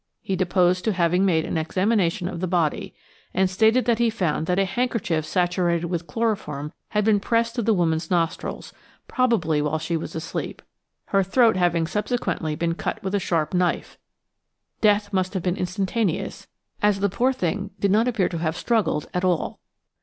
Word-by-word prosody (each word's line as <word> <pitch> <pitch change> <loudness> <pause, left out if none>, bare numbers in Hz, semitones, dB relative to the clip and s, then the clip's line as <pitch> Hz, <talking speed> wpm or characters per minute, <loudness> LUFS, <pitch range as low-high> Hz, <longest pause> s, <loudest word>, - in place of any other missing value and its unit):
He 195 - -1
deposed 180 0 +2
to 220 - +2
having 180 +1 +2
made 160 -3 +2
an - - -1
examination 185 +1 +1
of 175 - -5
the 185 - -1
body, 170 -4 -1 0.4
and 190 0 +3
stated 220 +6 +3
that 235 -1 +2
he 235 -1 +3
found 175 -8 -1
that 180 - +1
a 195 - +3
handkerchief 205 -7 -1
saturated 175 0 +1
with 170 -1 -3
chloroform 180 -10 -2 0.2
had 210 -1 0
been 215 -2 +4
pressed 230 +2 0
to 240 - -1
the 225 0 +2
woman's 160 -2 0
nostrils, 170 -2 -2 0.3
probably 200 - +1
while 150 +1 0
she 165 +2 -2
was 160 - -5
asleep, 165 +1 -5 0.5
her 195 - +3
throat 225 +4 +3
having 175 -2 +2
subsequently 185 -5 -2
been 165 +1 -1
cut 215 +5 -4
with 190 0 -3
a 205 - +2
sharp 165 -4 -1
knife; 180 -1 -1 0.8
death 205 -1 +3
must 185 0 0
have 185 - -2
been 180 -1 0
instantaneous, 190 +1 -2 0.3
as 205 -1 +3
the 200 - +2
poor 240 +7 +1
thing 200 -4 -2
did 200 - +2
not 220 +4 +3
appear 225 -7 +1
to 170 - -4
have 160 0 -1
struggled 215 -10 0
at 180 - -1
all. 180 -3 0
185 Hz, 180 wpm, -24 LUFS, 170-210 Hz, 0.8 s, been